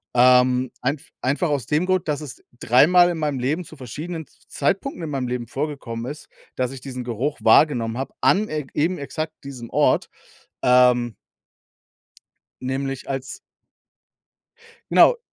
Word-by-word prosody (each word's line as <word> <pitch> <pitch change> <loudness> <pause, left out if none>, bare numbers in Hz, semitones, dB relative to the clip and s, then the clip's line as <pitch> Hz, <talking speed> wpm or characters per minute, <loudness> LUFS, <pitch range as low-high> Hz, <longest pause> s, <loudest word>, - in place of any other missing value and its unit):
ähm, 125 0 +4
einf 140 +3 -2
einfach 145 +7 0
aus 140 -6 -1
dem 155 +4 +1
Grund, 185 -3 0
dass 150 0 -1
es 150 -4 -9 0.2
dreimal 175 +9 +5
in 170 - -3
meinem 150 -3 -1
Leben 145 +8 -1
zu 155 - -13
verschiedenen 155 +6 -6
Z - - -29
Zeitpunkten 190 - -1
in 155 - -5
meinem 135 -3 -2
Leben 125 -1 -3
vorgekommen 130 -3 -4
ist, 150 +1 -10 0.3
dass 130 0 -1
ich 135 - -8
diesen 130 -2 -6
Geruch 125 +5 -2
wahrgenommen 120 -7 +4
hab 135 +2 -4
an 210 +3 +3
eg 150 -3 -4
eben 170 +5 0
exakt 155 +3 -4
diesem 125 -4 -8
Ort. - - +2 0.5
Ähm 125 -2 +4 1.5
nämlich 135 +1 -3
als 135 -1 -4 1.5
Genau. 485 - +6
135 Hz, 145 wpm, -22 LUFS, 125-155 Hz, 1.5 s, Genau